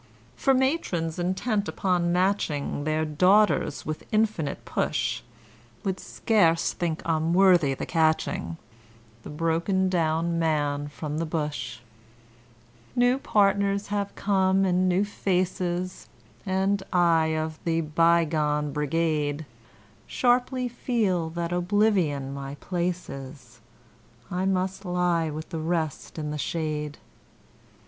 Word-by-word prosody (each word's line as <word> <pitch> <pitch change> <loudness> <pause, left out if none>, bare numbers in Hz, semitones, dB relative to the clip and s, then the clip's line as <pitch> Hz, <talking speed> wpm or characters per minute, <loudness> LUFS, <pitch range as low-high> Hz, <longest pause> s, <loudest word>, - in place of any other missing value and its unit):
For 270 - +2
matrons 190 - 0
intent 200 +4 0
upon 175 -2 0
matching 175 -6 0
Their 155 0 +1
daughters 185 +8 +3
with 155 0 -5
infinite 215 -9 0
push, - - -1 0.6
Would 190 -1 -2
scarce 170 -7 +2
think 170 -2 -3
him 165 +1 +1
worthy 175 -8 +5
the - - -4
catching, 155 - 0 0.6
The - - -10
broken 165 +5 0
down 165 -1 0
man 145 -3 0
from 150 +1 -5
the 165 - -1
bush. 150 -7 -3 1.1
New 245 +2 +3
partners 200 -4 +2
have 205 -1 -2
come 195 -1 +2
and 185 0 +2
new 185 +3 +2
faces, 185 -2 -2 0.4
And 190 +1 +1
I, 165 -3 +3
of 155 0 -3
the 165 -1 +1
bygone 155 -2 +2
brigade, 150 0 0 0.6
Sharply 250 0 +1
feel 215 -9 0
that 170 +1 -3
oblivion 180 -7 +1
my 140 0 -6
place 180 +2 -2
is 130 -3 -10 0.7
I 185 +1 0
must 190 +1 -1
lie 175 -3 +1
with 155 +1 -6
the 165 - -4
rest 160 -2 -2
in 150 -1 -3
the 150 - -4
shade. 150 -2 -3
170 Hz, 115 wpm, -26 LUFS, 155-190 Hz, 1.1 s, worthy